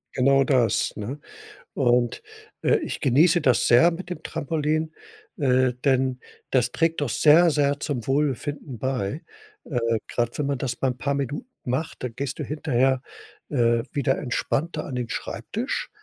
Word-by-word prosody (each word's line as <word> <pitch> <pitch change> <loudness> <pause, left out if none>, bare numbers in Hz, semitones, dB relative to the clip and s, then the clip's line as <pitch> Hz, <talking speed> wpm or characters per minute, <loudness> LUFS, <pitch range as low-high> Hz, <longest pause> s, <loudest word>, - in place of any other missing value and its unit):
Genau 135 +1 +4
das, 125 -4 +2
ne? 120 +8 -5 0.6
Und, 120 0 +2 0.4
äh, - - +3
ich - - -5
genieße 160 +7 +4
das 130 -5 +3
sehr 125 +9 +6
mit 180 +2 -8
dem 160 -2 -5
Trampolin, 155 +1 -1 0.4
äh, 130 -4 +2
denn 130 -2 +2 0.3
das 125 -3 +2
trägt 165 -1 +1
doch 145 - 0
sehr, 160 +7 +5
sehr 145 -1 +1
zum 140 -7 -3
Wohlbefinden 140 -2 -1
bei. 130 - -2 0.4
Äh, 130 -6 -2 0.3
grad 120 -1 -1
wenn 145 - 0
man 140 -2 -1
das 125 -2 -3
mal 135 - +2
'n 125 - -7
paar 140 0 -1
Minuten 140 - -3 0.2
macht, 130 +4 -3
dann 120 -3 -4
gehst 140 0 -4
du - - -2
hinterher, 135 -3 +1 0.5
äh, 120 -3 +2
wieder 135 -2 +1
entspannter 155 +4 -2
an 130 - -5
den 120 -2 -3
Schreibtisch - - -4
135 Hz, 155 wpm, -24 LUFS, 125-150 Hz, 0.6 s, sehr